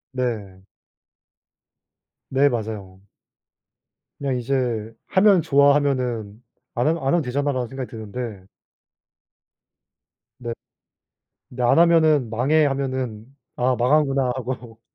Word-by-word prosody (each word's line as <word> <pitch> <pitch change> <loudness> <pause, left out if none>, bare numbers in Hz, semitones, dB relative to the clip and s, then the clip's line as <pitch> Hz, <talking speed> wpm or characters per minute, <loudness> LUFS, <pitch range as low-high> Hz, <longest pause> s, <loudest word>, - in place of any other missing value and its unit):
네. 105 -7 -3 1.7
네. 140 +2 +4
맞아요. 105 -5 -5 1.2
그냥 135 -3 -1
이제 120 -3 -2
'하면 190 -1 +4
좋아하면은 135 -7 +1 0.3
안 120 +4 +1
하면 165 +1 +1
안 - - -1
하면 170 +4 +3
되잖아.'라는 130 -1 -1
생각이 135 0 -6
드는데. 110 -2 -7 1.9
네. 120 -2 -5 1.0
근데 125 0 -6
"안 120 - +4
하면은 160 -7 +4
망해." 145 +7 +2
하면은 130 -5 -3 0.3
'아 125 +1 +1
망하는구나.' 135 0 +2
하고. 120 -3 -6
125 Hz, 215 characters per minute, -22 LUFS, 115-140 Hz, 1.9 s, 네